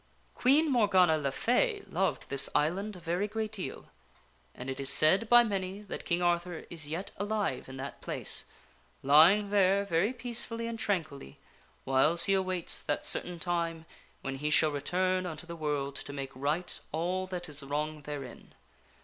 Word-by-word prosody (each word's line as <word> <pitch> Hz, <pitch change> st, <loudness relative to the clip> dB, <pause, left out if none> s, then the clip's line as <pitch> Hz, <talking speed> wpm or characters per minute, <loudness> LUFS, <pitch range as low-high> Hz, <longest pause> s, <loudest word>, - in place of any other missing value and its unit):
Queen 290 Hz, +5 st, +3 dB
Morgana 190 Hz, -9 st, +4 dB
le 140 Hz, -3 st, -2 dB
Fay 410 Hz, -, +1 dB
loved 190 Hz, 0 st, -1 dB
this 140 Hz, -1 st, +3 dB
island 190 Hz, +7 st, 0 dB
a -, -, -10 dB
very 175 Hz, +4 st, -2 dB
great 215 Hz, 0 st, -4 dB
deal, 200 Hz, -4 st, -6 dB, 0.7 s
and 125 Hz, -, -8 dB
it 135 Hz, 0 st, -4 dB
is 135 Hz, 0 st, +2 dB
said 190 Hz, +11 st, +4 dB
by 240 Hz, 0 st, +8 dB
many 195 Hz, -2 st, -3 dB
that 205 Hz, -, -7 dB
King 175 Hz, 0 st, 0 dB
Arthur 175 Hz, -1 st, -1 dB
is 160 Hz, -4 st, -4 dB
yet 165 Hz, +6 st, -5 dB
alive 205 Hz, -6 st, -2 dB
in 130 Hz, -, -8 dB
that 135 Hz, +1 st, -7 dB
place, -, -, 0 dB, 0.6 s
lying 170 Hz, +9 st, +5 dB
there 200 Hz, 0 st, +3 dB
very 190 Hz, +4 st, +1 dB
peacefully 235 Hz, -2 st, -1 dB
and 230 Hz, -1 st, -5 dB
tranquilly 155 Hz, -, -3 dB, 0.5 s
whiles 150 Hz, +6 st, +4 dB
he 195 Hz, -, +4 dB
awaits 185 Hz, -2 st, +1 dB
that 145 Hz, -, -2 dB
certain 180 Hz, 0 st, +1 dB
time 170 Hz, -1 st, -2 dB, 0.4 s
when 135 Hz, 0 st, -4 dB
he 150 Hz, +2 st, -2 dB
shall 155 Hz, 0 st, +4 dB
return 185 Hz, +6 st, 0 dB
unto 160 Hz, 0 st, -7 dB
the 170 Hz, 0 st, -8 dB
world 145 Hz, -3 st, -3 dB
to -, -, -8 dB
make 135 Hz, -1 st, -6 dB
right 150 Hz, +7 st, -2 dB
all 180 Hz, +4 st, -2 dB
that 180 Hz, -1 st, -5 dB
is 150 Hz, -1 st, -3 dB
wrong 150 Hz, +2 st, -3 dB
therein. 145 Hz, -3 st, -9 dB
175 Hz, 165 wpm, -30 LUFS, 150-200 Hz, 0.7 s, by